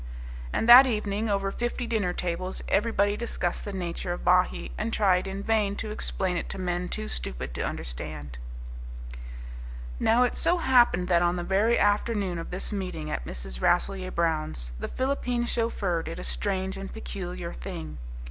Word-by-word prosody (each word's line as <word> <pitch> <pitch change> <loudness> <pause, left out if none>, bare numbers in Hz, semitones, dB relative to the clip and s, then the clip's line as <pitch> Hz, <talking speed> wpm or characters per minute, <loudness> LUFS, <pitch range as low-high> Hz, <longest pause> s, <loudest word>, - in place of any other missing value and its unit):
And 225 - 0
that 250 +3 +11
evening, 215 -2 -1
over 195 -1 +1
fifty 240 +2 -2
dinner 215 -6 0
tables, 180 +1 -3
everybody 205 -1 +2
discussed 210 -6 -2
the 205 - -4
nature 175 -2 -3
of 175 - -4
Bahee, 180 +1 +3
and 225 +2 -2
tried 195 -4 +3
in 195 +1 -4
vain 210 -2 +2
to 215 +1 -4
explain 190 -3 -1
it - - -4
to - - 0
men 180 -1 -2
too 70 - -3
stupid 60 0 -4
to - - -3
understand. 70 +1 -5 1.6
Now 235 +3 +4
it 245 - +1
so 345 +2 +2
happened 240 - +4
that 175 -1 +4
on 175 0 +2
the 175 - -2
very 205 +6 +3
afternoon 205 -3 +1
of 165 - -6
this 180 +4 -3
meeting 180 -6 -3
at - - -3
Mrs. 60 0 -5
Rasselyer 185 +1 +2
Brown's, 155 - -1
the - - -3
Philippine 250 -2 -1
chauffeur 210 -8 0
did - - -6
a - - -6
strange 185 - -1
and 195 0 -6
peculiar - - -5
thing. 75 +4 -6
185 Hz, 165 wpm, -27 LUFS, 165-215 Hz, 1.6 s, that